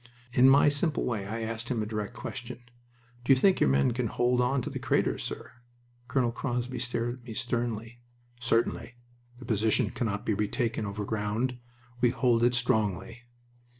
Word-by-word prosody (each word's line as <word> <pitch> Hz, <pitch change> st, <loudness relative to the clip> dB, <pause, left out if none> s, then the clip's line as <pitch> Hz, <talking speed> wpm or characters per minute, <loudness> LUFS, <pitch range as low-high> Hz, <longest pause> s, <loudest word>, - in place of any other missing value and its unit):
In 130 Hz, -1 st, +6 dB
my 140 Hz, +2 st, +6 dB
simple 145 Hz, +1 st, +1 dB
way 105 Hz, -5 st, -2 dB
I 115 Hz, +3 st, -4 dB
asked 115 Hz, +1 st, -4 dB
him 115 Hz, -4 st, 0 dB
a -, -, -3 dB
direct 105 Hz, -1 st, -4 dB
question: 120 Hz, -2 st, -6 dB, 0.6 s
"Do 125 Hz, -, +2 dB
you -, -, +3 dB
think 190 Hz, +8 st, +4 dB
your -, -, +4 dB
men 70 Hz, -, +3 dB
can 125 Hz, 0 st, -1 dB
hold 125 Hz, +3 st, +1 dB
on 125 Hz, +1 st, +1 dB
to -, -, -3 dB
the -, -, -4 dB
craters, -, -, +1 dB
sir?" -, -, -6 dB, 0.6 s
Colonel 125 Hz, -3 st, +1 dB
Crosby 125 Hz, 0 st, -3 dB
stared 120 Hz, 0 st, -2 dB
at -, -, -21 dB
me 115 Hz, -2 st, -8 dB
sternly. 120 Hz, -2 st, -3 dB, 0.4 s
"Certainly. 120 Hz, 0 st, 0 dB, 0.4 s
The 125 Hz, -, -11 dB
position 110 Hz, -1 st, +1 dB
cannot 105 Hz, -4 st, -2 dB
be 110 Hz, -, +1 dB
retaken 110 Hz, +1 st, -1 dB
overground. 105 Hz, +4 st, -2 dB, 0.4 s
We 120 Hz, -, +5 dB
hold 120 Hz, -1 st, +2 dB
it 120 Hz, 0 st, +4 dB
strongly." 110 Hz, -1 st, -1 dB
120 Hz, 170 wpm, -29 LUFS, 110-125 Hz, 0.6 s, In